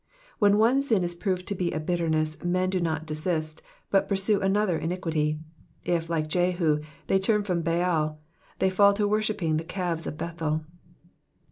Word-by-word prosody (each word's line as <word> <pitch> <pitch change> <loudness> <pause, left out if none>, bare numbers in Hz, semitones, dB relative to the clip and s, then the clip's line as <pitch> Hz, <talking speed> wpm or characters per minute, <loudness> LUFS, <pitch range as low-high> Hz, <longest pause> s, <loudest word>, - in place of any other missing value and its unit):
When 205 -1 +5
one 235 +5 +4
sin 225 -9 +1
is 175 0 -1
proved 180 0 -2
to - - -1
be 180 -2 -1
a 155 - -2
bitterness, 155 -2 -1
men 185 +1 +1
do 185 - 0
not 160 -2 -1
desist, 155 0 -3 0.3
but 195 0 +3
pursue 200 +1 +2
another 195 -3 +1
iniquity. 160 -3 -1 0.5
If, 170 -1 0
like 160 -2 0
Jehu, 175 -2 +1 0.3
they 195 - +2
turn 210 +2 +2
from 180 -4 -1
Baal, 165 -2 0 0.4
they 190 - +2
fall 200 +1 +5
to 205 0 +1
worshipping 205 -7 0
the 160 - -2
calves 175 -2 -3
of 150 - -5
Bethel. 160 -2 -2
175 Hz, 165 wpm, -27 LUFS, 160-195 Hz, 0.5 s, When